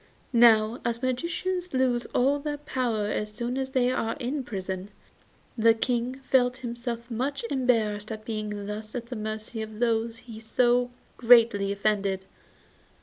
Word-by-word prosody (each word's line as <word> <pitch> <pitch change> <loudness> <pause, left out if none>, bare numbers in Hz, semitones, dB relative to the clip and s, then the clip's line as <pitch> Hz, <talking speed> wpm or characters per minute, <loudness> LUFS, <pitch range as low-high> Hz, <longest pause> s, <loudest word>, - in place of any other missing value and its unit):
Now 230 -1 +5
as 235 +1 -2
magicians 345 +6 -2
lose 250 -2 +1
all 275 +3 +2
their 295 0 -3
power 250 -7 -1
as 210 0 -2
soon 240 +3 -3
as 265 0 -2
they 255 -2 +2
are 225 -3 -1
in 265 +3 -2
prison, 190 -3 -5 0.7
the 225 0 +5
King 245 +2 -1
felt 250 -1 +3
himself 235 0 -5
much 260 +2 -2
embarrassed 225 -5 +1
at 215 0 -6
being 210 -2 -4
thus 215 +2 -6
at 240 -1 -3
the 250 - -4
mercy 215 +1 -4
of 220 0 -7
those 230 -1 +1
he 230 -2 -11
had - - -14
so 245 +2 +2 0.3
greatly 230 -4 +5
offended. 200 -2 0
235 Hz, 150 wpm, -27 LUFS, 215-250 Hz, 0.7 s, Now